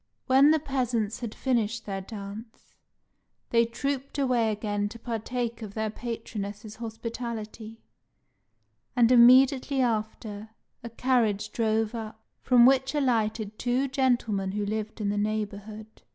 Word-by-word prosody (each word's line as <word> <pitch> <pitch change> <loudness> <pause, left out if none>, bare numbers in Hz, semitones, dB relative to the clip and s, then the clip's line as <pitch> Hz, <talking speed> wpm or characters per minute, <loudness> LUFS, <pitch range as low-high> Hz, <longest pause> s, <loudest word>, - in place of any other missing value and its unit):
When 270 +3 +6
the 315 - +5
peasants 245 -7 -1
had 235 -3 -6
finished 230 -3 -1
their 195 -1 -4
dance, 210 +3 -9 0.8
they 230 0 +4
trooped 275 +4 -3
away 250 -5 +2
again 205 -1 -2
to 230 - -10
partake 235 +1 -4
of 205 -2 -8
their 220 -1 -1
patroness's 215 -2 -6
hospitality; 225 -1 -6 1.1
and 240 -1 +4
immediately 260 +3 +6
after, 220 -3 -2 0.3
a 235 - -7
carriage 225 -4 +1
drove 220 -1 0
up, 220 -1 -6 0.2
from 245 -2 +6
which 265 +2 +3
alighted 220 -6 0
two 250 +3 +1
gentlemen 240 -8 0
who 205 0 -1
lived 215 +1 -4
in 205 - 0
the 205 0 0
neighbourhood. 215 0 -4
225 Hz, 125 wpm, -27 LUFS, 215-245 Hz, 1.1 s, When